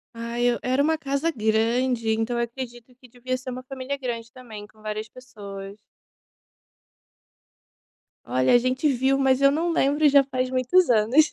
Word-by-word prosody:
Ai 235 +1 -4
eu 240 -1 +2
era 260 +3 +1
uma 320 +2 +2
casa 280 +2 -1
grande, 230 +1 0
então 225 +2 -1
eu 235 - +1
acredito 240 0 -8
que 255 0 -18
devia 255 +1 -4
ser 255 0 -7
uma 255 0 -6
família 265 +1 -5
grande 235 -3 -5
também, 220 -5 -11
com 215 - -25
várias 215 0 -5
pessoas. 200 -6 -10 2.5
Olha, 130 - +1
a - - +8
gente 255 +4 0
viu 265 0 +2
mas 265 -1 +2
eu 275 0 +6
não 335 +3 0
lembro 295 -1 +1
e 295 - +7
já 280 0 +6
faz 255 -1 -2
muitos 260 +8 +2
anos. 240 +7 +4
255 Hz, 170 wpm, -24 LUFS, 230-270 Hz, 2.5 s, a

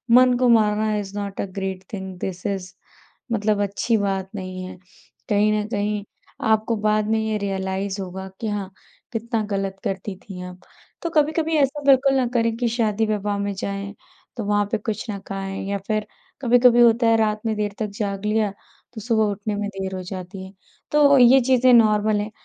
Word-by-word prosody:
मन 250 -1 +6
को 250 -1 +3
मारना 215 -1 +3
is 200 -1 -5
not 200 -1 -4
a - - -2
great 190 0 -5
thing 190 -2 -6
this 180 -1 -5
is 190 -2 -4 0.6
मतलब 210 -2 +1
अच्छी 205 +3 0
बात 195 -2 -1
नहीं 185 -1 -5
है। 185 0 -9 0.5
कहीं 210 +1 +3
न 210 0 -1
कहीं 210 -1 -1 0.5
आपको 220 +1 +2
बाद 215 0 +1
में 220 - +2
ये 220 -1 -1
रियलाइज़ 195 0 -3
होगा 190 +1 -6
कि 225 - -2
हाँ, 205 -2 -3 0.4
कितना 225 0 -1
गलत 195 -1 -2
करती 195 0 -3
थी 185 -1 -10
आप। 180 0 -10 0.4
तो 335 - -2
कभी-कभी 315 +1 +1
ऐसा 285 0 +1
बिल्कुल 275 0 +5
ना 260 - +2
करें 230 -1 +1
कि 240 0 0
शादी-विवाह 215 -3 0
में 200 0 -2
जाएँ, 200 +1 -4 0.4
तो 225 - -3
वहाँ 205 0 +2
पे 225 - +2
कुछ 220 +1 -4
ना 200 - -3
खाएँ 195 0 -4
या 200 - 0
फिर 215 -1 -1 0.3
कभी-कभी 245 -1 +5
होता 235 0 +5
है, 225 0 +5
रात 215 -1 +1
में 220 -1 0
देर 210 -1 -2
तक 215 - -1
जाग 200 -1 -2
लिया, 210 -1 +1 0.4
तो 220 - -7
सुबह 225 0 +2
उठने 205 +1 -3
में 205 0 -2
देर 190 -1 -5
हो 185 - -4
जाती 185 +1 -7
है, 190 - -13 0.4
तो 285 -2 +6
ये 255 +1 +7
चीज़े 255 0 +4
नॉर्मल 215 -2 +4
हैं। 210 +1 -5
210 Hz, 190 wpm, -23 LUFS, 195-230 Hz, 0.6 s, ये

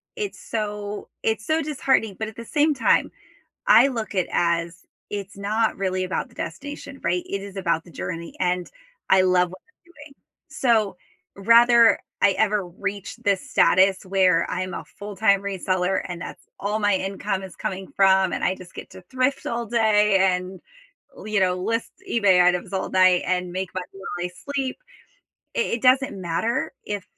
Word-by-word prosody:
it's 420 -4 -4
so 210 -1 -4
it's 220 0 -1
so 315 +1 +1
disheartening, 270 -8 0
but 220 - -2
at 220 - -10
the 230 - -8
same 300 +4 +2
time, 275 - +2 0.6
I - - +7
look 230 -6 -4
it 185 -2 0
as, 170 0 0 0.3
it's 200 -1 -6
not 215 +3 0
really 185 -1 -1
about 185 - -3
the - - -22
destination, 285 -1 -7
right? 175 +1 +1
It 200 0 -4
is 200 0 -9
about 170 -3 0
the 175 - -15
journey, 165 +2 -6
and 180 -1 0 0.4
I 190 0 +6
love 180 -1 +3
what 185 - -12
I'm 360 -6 -27
doing. 290 -3 -14 0.3
So, 220 -6 +1 0.4
rather 230 +2 +6 0.2
I 200 - +6
ever 210 -1 +1
reach 200 +3 -5
this 200 -2 -1
status 190 +1 +4
where 185 -3 +2
I'm 185 +1 -3
a - - -6
full-time 205 -1 +1
reseller 190 -1 -1
and 175 -1 -6
that's - - -9 0.2
all 205 +2 -1
my 205 -2 +2
income 195 0 -3
is 190 -2 -10
coming 190 0 -5
from, 190 -1 +4
and - - -3
I 185 - +2
just 180 -2 -14
get - - -9
to 185 - -12
thrift 260 +1 0
all 235 0 -2
day 210 -3 +3 0.2
and, 185 +1 -5 0.5
li 215 -1 -3
know, 185 -1 +2
list 225 +5 -2 0.2
eBay 195 -6 +4
items 180 +1 +1
all 190 - -2
night 185 -1 +4
and 180 -1 -1
make 185 +1 -3
money 185 -1 -4
while 180 -2 -5
I - - -8 0.2
sleep, 265 -2 -1 0.8
i - - +2
it 235 - -1
doesn't 260 -4 +3
matter 185 +8 -1
if 205 -2 -4
195 Hz, 175 wpm, -23 LUFS, 185-225 Hz, 0.8 s, I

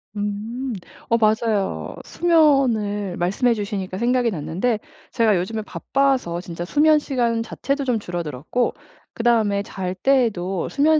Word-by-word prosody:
음. 215 +5 -3 0.4
어 230 - +4
맞아요. 215 -2 0
수면을 245 - +2
말씀해 200 +8 +2
주시니까 200 -3 -4
생각이 240 +1 +2
났는데 180 +8 -1 0.3
제가 225 -4 +3
요즘에 215 +5 -2
바빠서 255 -9 0
진짜 175 -1 -6
수면 305 - +4
시간 240 -5 0
자체도 275 +4 -2
좀 250 -4 0
줄어들었고 175 - -2 0.4
그다음에 220 -4 +2
잘 190 -3 -4
때에도 195 -7 +1
수면 305 +2 +3
220 Hz, 295 characters per minute, -22 LUFS, 190-250 Hz, 0.4 s, 어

